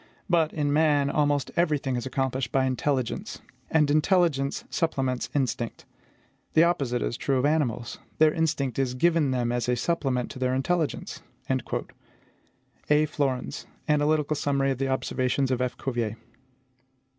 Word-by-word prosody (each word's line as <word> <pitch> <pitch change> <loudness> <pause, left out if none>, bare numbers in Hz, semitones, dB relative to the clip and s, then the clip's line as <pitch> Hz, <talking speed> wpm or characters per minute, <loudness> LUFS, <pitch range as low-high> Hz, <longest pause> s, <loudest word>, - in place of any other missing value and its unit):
But, 165 -4 +2
in 145 -2 0
man, 145 -2 +3
almost 145 -2 +1
every 165 -3 +2
thing 135 -2 -3
is 120 +1 -3
accomplished 130 -2 -1
by 135 -1 +2
intelligence; 130 -1 -1 0.3
and 150 -2 +3
intelligence 155 -3 +2
supplements 135 -6 -1
instinct. 120 -4 -2 0.7
The 160 - +7
opposite 135 -8 +1
is 120 - -2
true 135 -1 0
of 130 - +1
animals: 125 -6 0 0.2
their 155 -1 +5
instinct 145 -6 0
is 130 -2 0
given 165 +1 +3
them 125 -2 0
as 120 0 -1
a 125 - +3
supplement 130 -3 -1
to 130 - -9
their 130 0 +1
intelligence.'" 160 +4 -1 1.9
Flourens: 135 -4 -2 0.2
Analytical 150 0 +2
Summary 140 -1 +1
of 130 - -3
the 135 - 0
Observations 130 0 0
of 125 -1 0
F. 125 -1 -2
Cuvier. 120 -4 -2
135 Hz, 140 wpm, -26 LUFS, 125-150 Hz, 1.9 s, The